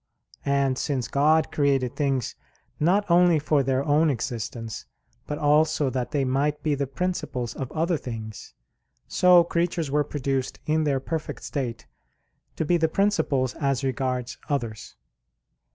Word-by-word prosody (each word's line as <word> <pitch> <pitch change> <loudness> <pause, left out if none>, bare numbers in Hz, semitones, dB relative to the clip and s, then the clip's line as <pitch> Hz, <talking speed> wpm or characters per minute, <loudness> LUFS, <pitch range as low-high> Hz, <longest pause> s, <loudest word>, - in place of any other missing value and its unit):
And 140 -2 +1
since 135 -5 -1
God 155 +3 +3
created 135 -4 +1
things 135 -5 0 0.5
not 190 +7 +3
only 175 -1 +5
for 150 -1 +2
their 135 0 0
own 155 +2 +3
existence, 115 -3 -4 0.4
but 150 - -3
also 150 -1 +2
that 125 -2 -2
they 140 -2 0
might 145 +3 0
be 155 - +1
the 140 -1 -1
principles 135 -6 -3
of 135 -2 -6
other 165 +1 0
things; 110 -5 -8 0.5
so 180 -1 +6
creatures 170 -3 -1
were 150 +1 +2
produced 135 -2 -2
in 155 0 +1
their 140 -2 +1
perfect 160 +3 -5
state 120 -5 -4 0.7
to 160 - -1
be 175 +3 +3
the 160 -1 +1
principles 160 -10 +1
as 140 -3 -1
regards 130 -2 -2
others. 115 -7 -3
140 Hz, 140 wpm, -25 LUFS, 130-155 Hz, 0.7 s, so